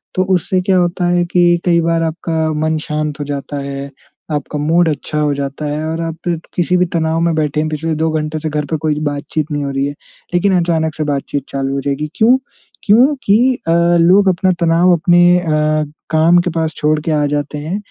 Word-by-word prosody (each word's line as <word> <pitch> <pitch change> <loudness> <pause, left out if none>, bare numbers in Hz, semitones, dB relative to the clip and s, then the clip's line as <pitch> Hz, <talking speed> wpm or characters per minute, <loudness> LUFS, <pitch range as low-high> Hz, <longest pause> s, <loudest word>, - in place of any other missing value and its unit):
तो 185 - +2
उससे 185 +1 0
क्या 185 0 +2
होता 175 0 0
है 175 0 +2
कि 175 0 +1 0.2
कई 170 -1 +3
बार 165 0 +1
आपका 160 -1 -2
मन 155 0 0
शांत 150 -1 -3
हो 145 - -3
जाता 145 0 -5
है 140 0 -6 0.4
आपका 150 0 -3
मूड 165 +3 +2
अच्छा 150 0 -3
हो 150 -1 +1
जाता 140 +2 -4
है 150 +1 -3
और 160 +1 -3
आप 165 +1 -3 0.2
किसी 180 +1 +1
भी 180 - +3
तनाव 160 0 0
में 170 0 +1
बैठे 150 -1 -1
हैं 155 0 -1
पिछले 160 +1 -2
दो 160 +1 0
घंटे 155 +1 -4
से 155 - -3
घर 150 -1 -2
पे 160 - +1
कोई 150 -1 0
बातचीत 150 +2 -4
नहीं 145 -1 -2
हो 140 - -3
रही 135 0 -1
है 145 - -3 0.4
लेकिन 185 +2 +2
अचानक 160 -2 0
से 155 - -2
बातचीत 145 -1 -2
चालू 135 0 -2
हो 140 - -2
जाएगी, 140 +2 -3
क्यों? 235 +4 +4 0.5
क्योंकि 240 0 +3 0.3
अ, - - +2 0.3
लोग 190 +4 +5
अपना 185 +1 +1
तनाव 170 +2 +4
अपने 175 +1 +4
अ, 155 -2 0 0.2
काम 160 +2 +4
के 180 - -2
पास 160 -1 -1
छोड़ 150 0 +1
के 160 - -2
आ 150 -1 +1
जाते 145 0 -3
हैं। 155 +6 -4
160 Hz, 210 wpm, -16 LUFS, 150-175 Hz, 0.5 s, लोग